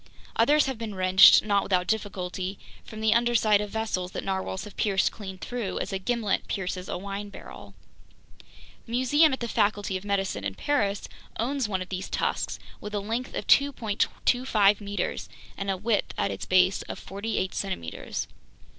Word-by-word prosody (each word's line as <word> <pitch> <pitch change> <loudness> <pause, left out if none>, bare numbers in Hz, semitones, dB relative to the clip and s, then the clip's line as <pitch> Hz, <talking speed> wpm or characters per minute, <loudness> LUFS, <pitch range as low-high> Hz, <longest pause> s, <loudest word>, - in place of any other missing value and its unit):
Others 290 +6 +4
have 265 -4 -3
been 220 -3 -5
wrenched, 185 +1 +7
not 200 -2 +3
without 180 -2 +1
difficulty, 190 -3 -3 0.3
from 220 -1 -9
the 220 0 +4
undersides 230 -3 +3
of 210 - -4
vessels 200 -4 -2
that - - -4
narwhales 190 -1 -3
have 210 -2 -10
pierced 195 -2 +2
clean 190 -3 -8
through, 235 0 -4
as - - -3
a 190 - -1
gimlet 225 0 -1
pierces 185 -1 -3
a - - -2
wine 200 +2 -5
barrel. 200 - -11 1.1
The 230 - -7
museum 290 +6 +4
at 265 - -3
the 235 - -1
Faculty 205 -3 +1
of 185 - -10
Medicine 195 - -1
in 95 -1 -3
Paris 205 -9 0 0.3
owns 255 0 -1
one 190 -2 -1
of 185 - -16
these 185 0 -4
tusks - - -1 0.2
with 210 0 -6
a - - +1
length 230 +5 -3
of - - -3
2.25 225 -4 +2
meters 205 0 -3 0.3
and 195 0 -4
a 190 - 0
width 210 +2 0
at 100 - 0
its 95 - -6
base 185 +1 +4
of - - -4
forty 200 +3 -4
eight 185 - -1
centimeters! 85 - -4
205 Hz, 175 wpm, -27 LUFS, 190-225 Hz, 1.1 s, wrenched